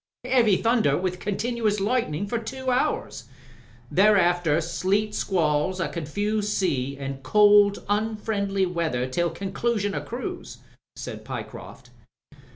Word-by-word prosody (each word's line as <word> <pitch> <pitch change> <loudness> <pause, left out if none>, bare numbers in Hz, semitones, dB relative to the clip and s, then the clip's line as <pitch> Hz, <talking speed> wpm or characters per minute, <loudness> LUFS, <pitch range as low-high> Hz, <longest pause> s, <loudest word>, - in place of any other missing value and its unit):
"Heavy 240 -6 +4
thunder 225 - +2
with 180 0 -2
continuous 210 +1 -1
lightning 200 -5 0
for 230 +3 -2
two 260 +3 -4
hours. 250 +1 -1 0.7
Thereafter 175 -6 +4
sleet 195 +6 0
squalls, 175 -1 0
a 165 -4 -1
confused 205 +7 -2
sea, 140 -10 -1
and 135 -1 -6
cold, 205 +7 +5
unfriendly 205 -2 0
weather 165 -8 -1
till 170 +7 0
conclusion 200 +4 -2
o' - - -2
cruise," 240 +2 -6 0.4
said - - -7
Pyecroft. - - -8
200 Hz, 115 wpm, -25 LUFS, 170-215 Hz, 0.7 s, cold